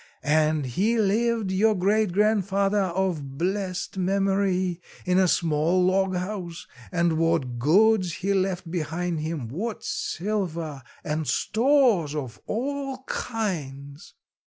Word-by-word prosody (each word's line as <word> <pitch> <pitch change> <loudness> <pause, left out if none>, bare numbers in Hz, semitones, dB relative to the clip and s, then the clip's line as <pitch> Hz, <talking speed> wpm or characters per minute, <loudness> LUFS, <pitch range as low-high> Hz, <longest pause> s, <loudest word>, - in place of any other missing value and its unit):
And 155 -1 +2
he 200 - +1
lived, 220 0 +1
your 215 +3 +3
great 205 +2 +2
grandfather 200 0 +2
of 155 -8 -2
blessed 190 +2 -2
memory, 190 -1 +1 0.2
in 180 +1 +3
a 190 - +4
small 165 +2 +2
log 190 0 +2
house; 180 -2 -5 0.3
and 170 -3 +1
what 160 -8 0
goods 185 - +4
he 195 +4 -1
left 185 -3 -1
behind 170 0 -2
him, 155 -5 -3
what 205 - -4
silver, 170 -7 -3 0.2
and 150 0 -2
stores 230 - +2
of 130 -6 -5
all 270 +2 -3
kinds! 155 - -5
185 Hz, 115 wpm, -25 LUFS, 160-205 Hz, 0.3 s, a